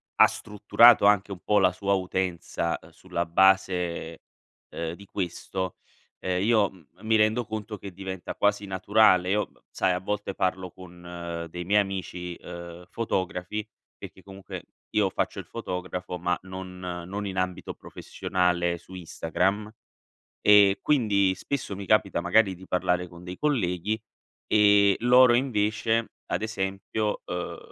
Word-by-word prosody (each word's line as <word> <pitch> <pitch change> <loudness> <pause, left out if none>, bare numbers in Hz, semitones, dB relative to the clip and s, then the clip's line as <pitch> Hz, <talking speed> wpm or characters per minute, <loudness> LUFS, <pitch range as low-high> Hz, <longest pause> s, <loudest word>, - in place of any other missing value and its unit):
ha - - +8
strutturato 105 +2 +4
anche 105 -1 +4
un 95 - -6
po' 105 - +2
la 95 -1 +4
sua 100 +2 -1
utenza, 90 -3 -1
uhm, - - -16
sulla 85 +1 -4
base 90 -2 +2 0.5
ehm, 85 0 -4
di 100 +3 -12
questo, 95 -1 -4 0.4
ehm, 90 +1 -1
io 110 -3 +3
m 95 -3 -18 0.2
mi 110 0 +2
rendo 110 +2 +3
conto 110 0 -5
che 100 - -8
diventa 95 0 -6
quasi 105 0 +1
naturale. 95 -1 +3
Io 105 +1 +1
b - - -30
b - - -27
sai, 90 - +1
a 90 - -1
volte 105 0 -3
parlo 95 -1 -1
con 85 -2 -8
dei 90 +1 -6
miei 105 +3 +4
amici 90 -3 -5
ehm, 85 0 -10
fotografi, 100 -2 -3 0.3
perché 95 - -11
comunque 95 0 -9 0.3
io 105 -3 +2
faccio - - -2
il - - -7
fotografo, 90 0 -5
ma 90 +1 0
non 95 0 -8 0.3
non 100 +2 -4
in 95 -1 -5
ambito 90 -1 -2
professionale 90 -2 -1
su 90 +2 -16
Instagram. 95 +4 -2 0.7
E 100 -1 +6
quindi, 100 -9 +2
spesso 130 -5 -4
mi 100 0 -7
capita 100 -1 +2
magari 95 +2 +3
di 95 - -13
parlare 90 -1 0
con 85 0 -13
dei 90 0 -7
colleghi, 110 - 0 0.5
ehm, 100 -2 +5
loro 125 0 +6
invece, 115 -2 0
ad - - -2
esempio, 105 0 -2
uhm, 90 0 -4
95 Hz, 145 wpm, -26 LUFS, 90-105 Hz, 0.7 s, ha